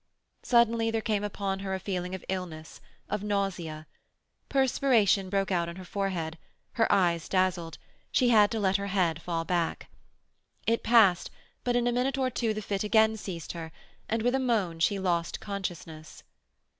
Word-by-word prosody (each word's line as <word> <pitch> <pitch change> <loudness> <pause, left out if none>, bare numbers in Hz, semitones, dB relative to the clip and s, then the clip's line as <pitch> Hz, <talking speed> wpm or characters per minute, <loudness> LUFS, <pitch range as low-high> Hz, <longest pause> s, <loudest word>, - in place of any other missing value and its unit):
Suddenly 230 -2 +3
there 225 0 0
came 215 -2 -1
upon 200 -1 -3
her 190 -1 -3
a - - -4
feeling 185 -1 -3
of 190 - -10
illness, 175 -4 -5 0.3
of 210 -1 -2
nausea. 195 -7 -2 0.6
Perspiration 245 -8 +3
broke 195 0 0
out 170 -2 +1
on 170 - -7
her 185 0 -9
forehead; 175 -5 -3 0.3
her 225 - +1
eyes 175 -4 +2
dazzled; 185 -4 0 0.3
she 250 - +3
had 210 -3 +6
to 225 - -2
let 195 -1 +2
her 200 0 -4
head 175 -5 0
fall 165 -1 -2
back. 170 -2 -1 0.8
It 230 0 +1
passed, 215 -6 +4 0.3
but 245 -1 0
in 240 0 +2
a 245 - +2
minute 255 +3 0
or 260 -1 0
two 230 -1 0
the 215 0 -4
fit 200 0 -2
again 220 +1 +4
seized 180 -6 -6
her, 165 -2 -7 0.4
and 225 0 0
with 245 +1 +2
a 265 - +2
moan 210 -10 0
she 200 +5 +2
lost 175 -3 -1
consciousness. 175 -6 -6
195 Hz, 170 wpm, -28 LUFS, 175-225 Hz, 0.8 s, had